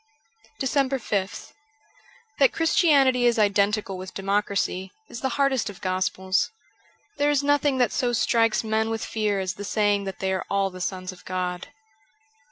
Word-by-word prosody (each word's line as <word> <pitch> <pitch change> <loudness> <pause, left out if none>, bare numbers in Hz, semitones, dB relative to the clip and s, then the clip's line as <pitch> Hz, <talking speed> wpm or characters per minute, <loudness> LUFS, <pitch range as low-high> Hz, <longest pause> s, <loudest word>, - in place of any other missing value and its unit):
376 265 - -1 0.4
DECEMBER 200 -3 +2
5th 165 - -11 0.9
THAT 275 -2 +5
Christianity 275 -7 +3
is 240 0 +2
identical 200 -1 +1
with 185 0 -9
democracy, 195 -1 -1 0.2
is 235 - -8
the 265 - 0
hardest 270 -5 +1
of 200 - -10
gospels; 185 0 0 0.7
there 290 0 +2
is 290 -1 +2
nothing 290 -1 +2
that 250 -2 +2
so 245 -1 0
strikes 230 -1 +2
men 220 0 0
with 225 0 -3
fear 210 -2 -1
as 185 -1 -2
the 205 - -8
saying 205 0 +1
that 195 - -5
they 190 0 -1
are 190 - -2
all 195 -1 +1
the 185 0 -9
sons 185 0 -3
of 185 - -15
God. 180 -1 -3
205 Hz, 165 wpm, -25 LUFS, 190-245 Hz, 0.9 s, THAT